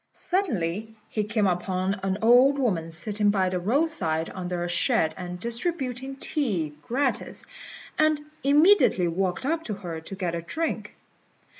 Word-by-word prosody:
Suddenly 220 - -1
he 215 - -1
came 215 0 +1
upon 185 +2 0
an 195 0 -1
old 250 +5 +6
woman 185 -12 0
sitting 205 +6 0
by 190 -2 +2
the 180 0 -1
roadside 195 - 0
under 180 -1 -3
a - - -2
shed 160 -2 +2
and 180 -1 -6
distributing 260 - -2
tea 210 - -1
gratis, 260 - -2 0.5
and 310 -1 +4 0.2
immediately 290 - +5
walked 180 +6 -1
up 325 +3 0
to 210 - -3
her 170 -5 -6
to 195 - -8
get 180 -3 -2
a 170 - -2
drink. 320 - -3
205 Hz, 145 wpm, -26 LUFS, 175-270 Hz, 0.5 s, old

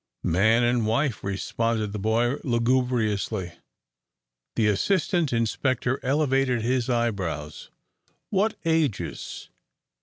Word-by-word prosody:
"Man 110 +8 +3
and 120 -2 +2
wife," 120 +2 0
responded 105 +2 -1
the 105 - -3
boy, 115 +5 +1
lugubriously. 115 -6 0 1.0
The 110 - +2
assistant 165 - +1
inspector 125 +2 0
elevated 135 -3 +1
his 125 +1 0
eyebrows. 95 - -2 0.6
"What 210 +2 +1
ages?" 160 -9 -1
120 Hz, 90 wpm, -25 LUFS, 110-130 Hz, 1.0 s, Man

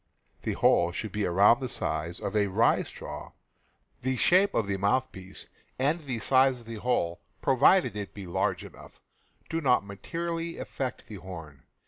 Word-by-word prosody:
The - - -2
hole 85 0 +3
should 105 +4 -5
be 105 +1 -1
about 100 +7 +5
the 130 -2 -3
size 85 -3 -2
of 100 - -4
a 105 -1 +3
rye 105 +5 +3
straw. - - -8 0.7
The 130 +1 0
shape 185 +10 +4
of 110 - +2
the 100 -1 -2
mouthpiece 95 -2 -2 0.3
and 145 +6 +1
the 135 -6 -4
size 130 +3 +3
of 120 - -15
the 115 0 -7
hole 95 -7 -1
— - - -41
pro 135 - +3
vided 130 - +5
it 100 -2 -6
be 100 -2 -7
large 85 - -1
enough - - -14 0.2
— - - -36
do 165 0 -1
not 125 -7 +3
materially 165 +11 -4
affect 130 -2 -4
the 105 - -8
horn. 80 -6 -10
110 Hz, 180 wpm, -28 LUFS, 95-130 Hz, 0.7 s, about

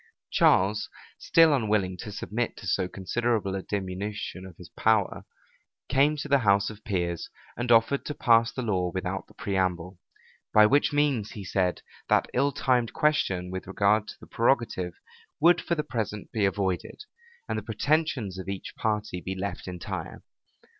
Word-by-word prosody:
Charles, 100 +3 +3 0.3
still 165 -2 +5
unwilling 105 -7 +1
to 105 - -7
submit 115 +3 -3
to - - -10
so 95 0 0
considerable 100 +2 -1
a 95 - -2
diminution 95 -1 -4
of 90 - -14 0.2
power, 110 -2 +1 0.6
came 140 +3 +3
to 145 - -4
the 140 -1 +4
house 100 -2 +3
of 105 0 -13
peers, 85 -4 -2 0.3
and 120 0 -2
offered 115 +4 +4
to 150 - -4
pass 115 -1 +4
the 130 - -4
law 95 -5 0
without 95 +1 -4
the - - -20
preamble; 90 -2 -2 0.6
by 105 0 +8
which 140 +7 +3
means, 145 -8 +1
he 100 -3 -7
said, 90 -1 0 0.3
that - - +2
ill 140 +3 +2
timed 125 -4 +1
question 95 - +1
with 95 0 -6
regard 105 +2 +2
to - - -8
the - - -13
prerogative 115 -7 0 0.5
would 170 +2 +5
for 170 - -1
the 150 - -1
present 105 -5 -4
be 105 -3 +1
avoided, 95 - -2 0.4
and - - -1
the - - -9
pretensions 145 - 0
of 95 - -6
each 100 -1 -5
party 105 -4 -2
be 95 +2 -4
left 95 -1 -5
entire. 90 -2 -6
105 Hz, 160 wpm, -27 LUFS, 95-120 Hz, 0.6 s, by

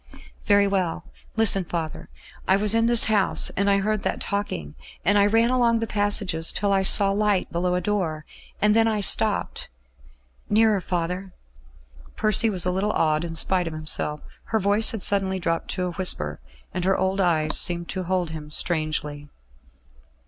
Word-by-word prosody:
"Very 200 0 +4
well, 185 -3 -2 0.3
listen, 220 -4 +3
father.... 165 -2 -6 0.4
I 190 - +4
was 210 +1 +3
in 230 0 +2
this 235 -1 +2
house; 210 -3 +1
and 200 +1 -1
I 200 - +3
heard 210 +1 -1
that - - -3
talking; 140 - -4 0.3
and 200 - +4
I 200 0 +4
ran 225 +3 +2
along 240 -2 +2
the 225 - -2
passages, 200 -6 0
till 200 -1 -1
I 195 - +2
saw 195 +1 +3
light 205 -1 0
below 180 +1 -1
a 180 - -1
door; 170 -6 -2 0.3
and 210 +1 +3
then 225 0 +4
I 215 -2 0
stopped.... 200 - +1 0.8
Nearer, 215 -2 +3
father." 180 +2 -4 0.8
Percy 215 +1 +2
was 185 -4 +1
a 180 - +1
little 200 +3 -1
awed 155 0 0
in 165 -1 -6
spite 180 +1 +1
of 165 - -5
himself. 155 -1 -2 0.2
Her 220 - -1
voice 205 +2 +4
had 220 -4 -3
suddenly 195 -1 +2
dropped 165 -2 -2
to 185 -1 -2
a 180 - -3
whisper, 75 - -3 0.3
and 180 - -3
her 190 +1 +1
old 190 +1 -1
eyes 155 -4 0
seemed 170 -1 +1
to 190 - -4
hold 180 -2 -2
him 155 -2 -8
strangely. 150 -2 -3
190 Hz, 175 wpm, -23 LUFS, 170-205 Hz, 0.8 s, Very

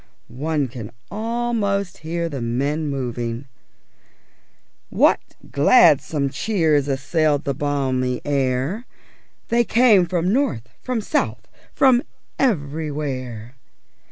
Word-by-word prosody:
_ - - -14
One 150 0 -1
can 115 -4 -8 0.2
almost 220 -4 -1
hear 170 +2 -3
the 140 -6 -5
men 140 +7 -1
moving. 120 -2 -3 1.5
_What - - +4 0.3
gladsome 145 - +4
cheers 160 -10 +1
assailed 145 +2 +1
the 140 - -1
balmy 130 -3 -1
air 140 - -1 0.6
_ - - 0
_They 240 - +5
came 225 -7 +5
from 180 +2 0
north, 130 - 0
from 250 -3 -2
south, 295 +8 -2 0.2
from 255 -3 +4 0.4
everywhere! 140 - -2
150 Hz, 100 wpm, -21 LUFS, 135-200 Hz, 1.5 s, They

